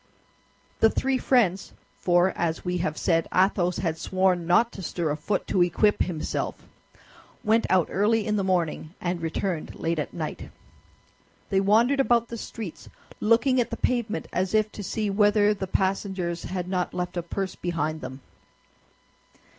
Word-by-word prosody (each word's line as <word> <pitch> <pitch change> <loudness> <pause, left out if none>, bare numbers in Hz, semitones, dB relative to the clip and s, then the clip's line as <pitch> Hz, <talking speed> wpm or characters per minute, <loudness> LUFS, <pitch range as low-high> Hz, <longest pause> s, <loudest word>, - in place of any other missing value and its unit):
The 225 - +6
three 265 +3 0
friends—for, 190 -5 +1
as 165 +1 -2
we 180 0 -1
have 155 -3 -2
said, 165 -2 +1
Athos 185 -1 +2
had 165 -3 -2
sworn 185 -2 +1
not 225 +7 +4
to 195 - -9
stir 170 -3 -2
a - - 0
foot 190 +6 -2
to 185 - +1
equip 180 +4 +3
himself—went 215 +6 -3
out 185 -3 +3
early 215 +2 +2
in 210 - 0
the 200 - 0
morning, 175 -2 -1
and 175 -1 -2
returned 165 +1 -3
late 165 0 -1
at 150 - -3
night. 155 -2 -5 1.0
They 195 -1 +3
wandered 230 +8 +3
about 235 -3 +3
the 235 - -5
streets, 220 -5 -8 0.3
looking 240 +4 +3
at 235 - -2
the - - -4
pavement 235 -3 -1
as 185 +3 0
if 215 0 +2
to 205 - -8
see 210 +2 -2
whether 205 +1 +4
the 195 -2 -5
passengers 190 -2 -1
had 180 0 -4
not 180 -1 -2
left 180 0 -3
a 175 - -1
purse 190 +2 -4
behind 155 -3 -2
them. 130 +1 -7
190 Hz, 155 wpm, -26 LUFS, 175-210 Hz, 1.0 s, The